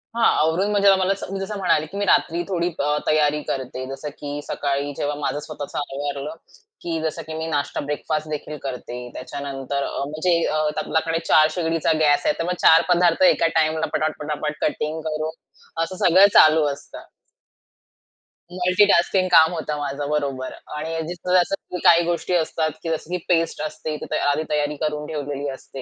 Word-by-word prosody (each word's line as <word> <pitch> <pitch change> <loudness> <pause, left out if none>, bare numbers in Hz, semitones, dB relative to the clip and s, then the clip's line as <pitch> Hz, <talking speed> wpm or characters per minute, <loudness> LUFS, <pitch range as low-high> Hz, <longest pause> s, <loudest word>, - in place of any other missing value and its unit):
हां, 235 - +1 0.2
आवरून 165 +6 +2
म्हणजे 200 -1 +4
आम्हाला 190 0 +3
स 195 - -10
मी 195 - -3
जसं 195 +2 -4
म्हणाले, 180 -5 +2
की 190 +6 -9
मी 205 - 0
रात्री 170 -2 +2
थोडी 175 -3 0
अ, 150 +1 +1
तयारी 150 -1 +2
करते. 130 -1 -4
जसं 135 +2 -6
की 145 0 -5
सकाळी 140 0 -2
जेव्हा 145 0 -1
माझं 145 0 -2
स्वतःचं 150 -1 -7
आवरलं, 145 +1 -4 0.5
की 165 -1 -3
जसं 160 +1 -2
की 160 - -6
मी 160 +1 -4
नाश्ता 145 -3 -2
ब्रेकफास्ट 155 +1 -2
देखील 150 0 -5
करते. 125 -2 -5
त्याच्यानंतर 140 0 -4
अ, - - -4
म्हणजे 155 +4 +1
अ, 155 - 0 0.2
आपल्याकडे 165 +1 0
4 155 0 +6
शेगडीचा 165 -2 0
गॅस 145 -2 +3
आहे, - - +3
तर - - 0
मग 180 - 0
4 160 +1 +7
पदार्थ 175 0 +3
एका 175 -2 +5
टाईमला 155 0 +1
पटापट-पटापट 150 0 -2
कटिंग 155 +1 -1
करून 155 +1 -3 0.5
असं 175 +3 -5
सगळं 190 +4 +7
चालू 155 0 +7
असतं. 140 - -12 1.4
मल्टीटास्किंग 185 0 +3
काम 160 -2 +6
होतं 155 -3 -3
माझं, 145 0 -3
बरोबर 140 -3 -2 0.2
आणि 160 +2 -3
जिथ 175 +1 -6
जसं 180 0 +1
काही 170 0 +6
गोष्टी 175 +1 -1
असतात, 160 -2 0
जसं 160 0 -3
की 180 - 0
पेस्ट 165 -2 +1
असते, 155 0 -4
तर - - -4
ते - - +1
आधी 145 +2 +1
तयारी 150 0 0
करून 150 -1 -2
ठेवलेली 145 -2 -4
असते 135 0 -10
155 Hz, 170 wpm, -22 LUFS, 145-170 Hz, 1.4 s, 4